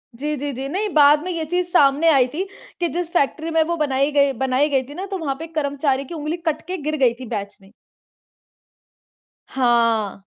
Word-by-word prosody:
जी, 300 +5 -2
जी, 285 +1 -3
जी। 265 +2 -4
नहीं 410 +7 -1
बाद 295 0 +5
में 365 - -3
ये 330 -2 -3
चीज़ 355 +3 -1
सामने 295 -1 +4
आई 270 -5 +4
थी 345 +5 -1 0.4
कि 345 - +1
जिस 345 0 -3
फ़ेेक्ट्री 320 0 0
में 325 0 +3
वो 340 +2 -2
बनाई 280 -1 +1
गई 280 -1 +3
बनाई 265 +3 +2
गई 270 -2 +1
थी - - -8
ना, 370 +6 -5
तो 395 -1 -4
वहाँ 295 -6 -3
पे 325 - -6
कर्मचारी 280 -3 -1
की 305 - -9
उँगली 310 +1 -3
कट 315 -1 0
के 370 +1 -3
गिर 305 +1 -2
गयी 255 -4 +3
थी 255 - -7
बैच 200 -1 -6
में। 195 +1 -19 1.8
हाँ। 230 -6 +1
295 Hz, 210 wpm, -21 LUFS, 265-325 Hz, 1.8 s, बाद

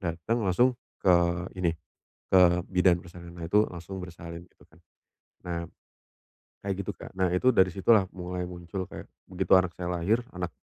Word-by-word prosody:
datang 85 +6 -2
langsung 105 +7 +3 0.3
ke 95 - +6 0.4
ini, 85 -3 0 0.5
ke 95 - +6 0.3
bidan 90 -1 +3
persalinannya 85 -1 -9
itu 105 +4 +4
langsung 90 +2 -7
bersalin 85 -1 -9
gitu - - -24
kan. 80 - -23 0.7
Nah, 85 -1 -2 1.1
kayak 100 -1 -1
gitu, - - -3
Kak. - - -11
Nah, 95 -1 +2
itu 130 +7 +4
dari 95 -5 +5
situlah 95 +2 +3
mulai 90 0 -4
muncul 90 +1 -6
kayak, - - -9 0.2
begitu 95 -1 -2
anak 90 -2 +2
saya 90 -1 -4
lahir, 100 +8 +1
anak 90 -1 -3
90 Hz, 160 wpm, -28 LUFS, 85-95 Hz, 1.1 s, ke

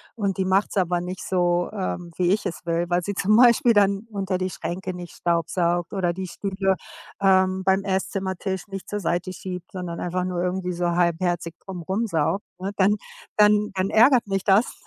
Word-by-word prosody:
und 200 -4 -1
die 190 - 0
macht's 195 +2 +1
aber 175 -2 +1
nicht 180 +1 -6
so, 175 -1 +1
ähm, 180 -3 -4
wie 180 0 +2
ich 205 - +1
es 175 - -3
will, 170 0 0
weil 175 0 +2
sie 205 +1 -3
zum 205 +2 +3
Beispiel 235 0 +6
dann 200 +1 +3
unter 195 -2 -1
die 185 0 -2
Schränke 185 +2 -4
nicht 175 -1 -9
staubsaugt 170 +1 0
oder 180 -3 0
die 185 +1 -5
Stühle, 195 +1 -1 0.4
ähm, 190 -1 +3
beim 190 +1 +2
Esszimmertisch 190 0 -2
nicht 195 -1 -7
zur 205 - -2
Seite 180 +1 -1
schiebt, 180 0 -7
sondern 180 -2 -5
einfach 180 +1 -2
nur 180 -1 -2
irgendwie 180 0 -2
so 175 0 0
halbherzig 170 -1 0
drum 185 -3 -6
rum 195 +7 -1
saugt, 180 +1 0
ne? 190 - -3
Dann 205 +2 +3 0.4
dann 210 0 +4
dann 190 0 -1
ärgert 240 +1 +5
mich 195 -1 -1
das, 205 +4 +2
185 Hz, 190 wpm, -24 LUFS, 175-195 Hz, 0.4 s, Beispiel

